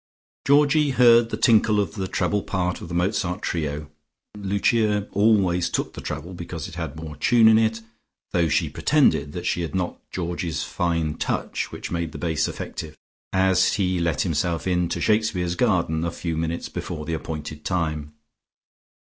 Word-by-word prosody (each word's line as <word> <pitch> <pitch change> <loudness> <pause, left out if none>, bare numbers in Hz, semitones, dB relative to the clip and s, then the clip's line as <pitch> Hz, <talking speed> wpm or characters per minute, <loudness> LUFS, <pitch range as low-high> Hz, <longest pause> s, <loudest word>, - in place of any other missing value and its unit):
Georgie 145 +1 +4
heard 120 -3 +5
the - - -3
tinkle 110 -3 +4
of 100 -5 -1
the 95 -2 -3
treble 105 +2 0
part 90 -3 -2
of - - -7
the 85 - -5
Mozart 90 +1 -1
trio 75 -2 -3 0.4
(Lucia 105 +1 +1
always 95 -4 +3
took - - -2
the - - -8
treble, 90 +3 -5
because 85 -3 -6
it - - -11
had 70 - -5
more 80 -1 -7
tune 115 +6 +4
in 110 0 +7
it, 110 0 +1 0.5
though 85 -2 +2
she - - +2
pretended 75 - +2
that 90 0 -5
she 90 - 0
had 85 +2 -4
not 90 -1 -2
Georgie's 85 -2 -3
fine 85 -3 -1
touch, - - -2
which - - -7
made 85 -2 -2
the - - -6
bass 80 -3 0
effective) 75 -1 -6 0.3
as 95 -1 +3
he 95 -2 0
let 85 -2 0
himself 85 -1 -1
in 90 -2 +1
to - - -2
Shakespeare's 105 -5 +1
garden 85 -6 +1
a 85 - 0
few 85 0 -4
minutes 80 +1 -2
before 75 - -5
the 85 - -3
appointed 75 -1 -5
time. 75 -5 -2
90 Hz, 170 wpm, -24 LUFS, 80-105 Hz, 0.5 s, in